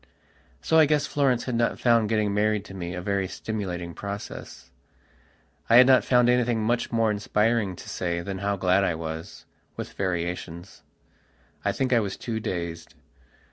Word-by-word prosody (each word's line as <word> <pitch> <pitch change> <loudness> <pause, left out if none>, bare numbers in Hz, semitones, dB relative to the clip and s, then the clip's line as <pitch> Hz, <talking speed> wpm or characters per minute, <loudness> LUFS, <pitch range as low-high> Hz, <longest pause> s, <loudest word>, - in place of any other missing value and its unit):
So 160 - +4
I 155 - +6
guess 150 0 +2
Florence 135 -5 +1
had 125 - -4
not 115 0 0
found 115 -3 +3
getting 110 -2 +1
married 105 0 +1
to - - -11
me 90 -2 -5
a 90 - -5
very 100 -1 0
stimulating 90 -4 -5
process. 100 +2 -8 1.0
I 115 - +6
had 125 +1 +9
not 130 -1 +5
found 125 -1 +4
anything 120 -2 +2
much 120 +2 0
more 115 -2 +2
inspiring 105 -1 0
to - - -12
say 85 -1 -2
than 95 +2 -5
how 100 0 0
glad 95 0 +2
I 85 -4 +1
was, 80 0 -7 0.3
with - - -6
variations. 90 -1 -4 0.8
I - - +1
think 130 -1 0
I 120 - +5
was 100 -3 -3
too 115 -2 -4
dazed. 85 -6 -5
105 Hz, 170 wpm, -26 LUFS, 90-115 Hz, 1.0 s, had